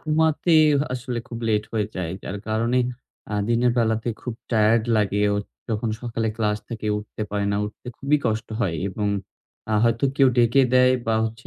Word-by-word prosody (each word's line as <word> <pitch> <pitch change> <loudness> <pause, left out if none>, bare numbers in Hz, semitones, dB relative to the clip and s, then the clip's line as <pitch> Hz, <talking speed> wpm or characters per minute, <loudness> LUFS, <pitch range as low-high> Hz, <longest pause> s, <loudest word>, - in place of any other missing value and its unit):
ঘুমাতে 160 +1 +2 0.4
আসলে 125 -1 -4
খুব 115 - -6
লেট 105 -1 +1
হয়ে 105 -3 0
যায়। 90 -2 -3
যার 100 - -5
কারণে 115 +3 +1 0.5
আ - - 0
দিনের 120 +1 +3
বেলাতে 110 0 +1
খুব 125 - -4 0.2
টায়ার্ড 110 0 +4
লাগে 105 -1 +1
অ - - 0 0.3
যখন 110 +1 -1
সকালে 115 -2 -2
ক্লাস 105 -2 0
থেকে 115 -2 -5
উঠতে 105 +1 -7
পারে 105 -1 -1
না, 100 - 0
উঠতে 105 +4 -9
খুবই 140 +2 +2
কষ্ট 110 -1 -1
হয়। 90 -7 0
এবং 105 +2 -2 0.6
আ - - +3
হয়তো 115 +2 +2
কেউ 135 -2 +6
ডেকে 120 +3 +5
দেয়, 125 0 +6
বা 115 - +2
হচ্ছে 115 +2 -6
115 Hz, 180 wpm, -23 LUFS, 105-120 Hz, 0.6 s, কেউ